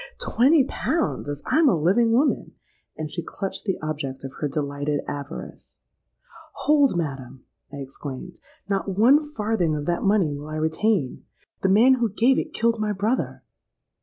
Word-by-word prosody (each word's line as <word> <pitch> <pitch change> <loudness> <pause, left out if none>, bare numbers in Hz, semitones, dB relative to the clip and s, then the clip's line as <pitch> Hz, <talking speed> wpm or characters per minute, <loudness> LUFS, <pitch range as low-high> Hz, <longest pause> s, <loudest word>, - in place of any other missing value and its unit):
'Twenty 275 +5 +4
pounds, 310 - -2
as 145 0 -5
I'm 315 -2 +4
a 175 - +2
living 205 +9 +3
woman!' 270 +6 +1 0.4
and 155 -1 -5
she 170 - -3
clutched 195 +4 -6
the 190 -3 -1
object 145 -4 -4
of 135 - -7
her 150 - 0
delighted 145 0 -2
avarice.—'Hold, 185 - -3
madam!' 135 -5 -5 0.3
I - - -8
exclaimed. 140 +4 -8 0.3
'Not 195 -1 -2
one 285 +7 +4
farthing 210 - 0
of 145 -1 -4
that 175 +1 0
money 195 -7 +2
will 145 +1 -8
I 155 - -5
retain! 160 - 0 0.4
The 190 - +2
man 230 +7 +6
who 230 - +2
gave 240 +6 +3
it - - -4
killed 230 0 +1
my 210 -1 0
brother!' 215 +6 -1
185 Hz, 155 wpm, -24 LUFS, 145-230 Hz, 0.4 s, man